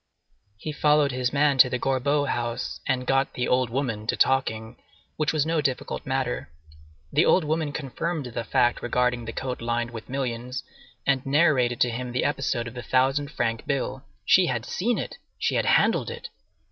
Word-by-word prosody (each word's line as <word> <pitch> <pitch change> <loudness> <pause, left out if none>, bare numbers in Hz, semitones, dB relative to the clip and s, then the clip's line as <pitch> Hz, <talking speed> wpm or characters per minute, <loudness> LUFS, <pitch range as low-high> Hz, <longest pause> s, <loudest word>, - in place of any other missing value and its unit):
He 155 - -5
followed 150 -1 +3
his 125 0 -1
man 140 -1 +2
to 125 - +8
the 125 - -1
Gorbeau 140 +3 +1
house, 120 -2 -3
and 130 -1 0
got 135 +1 +1
"the 125 - -1
old 125 -1 +2
woman" 115 -4 -2
to - - 0
talking, 115 -4 +1 0.4
which 155 0 +1
was 155 -2 +1
no 160 -1 +1
difficult 135 -2 -3
matter. 130 -8 -2 0.6
The 150 +3 +5
old 185 - +4
woman 155 0 -1
confirmed 150 +2 -3
the 120 -1 -4
fact 120 +1 +2
regarding 125 -1 0
the 115 - -4
coat 125 +1 -4
lined 120 0 -1
with 115 -1 -9
millions, 125 -1 -3 0.4
and 135 -2 +2
narrated 135 -5 +3
to 120 - +4
him 125 +1 -5
the 125 - 0
episode 135 -4 -1
of 115 - -8
the 125 - -6
thousand 135 +3 +1
franc 115 -5 -2
bill. 135 -1 -2 0.2
She 180 - +5
had 120 -4 -2
seen 235 +6 0
it! - - -5 0.2
She - - 0
had - - +1
handled - - +3
it! 475 0 -7
130 Hz, 185 wpm, -25 LUFS, 120-145 Hz, 0.6 s, to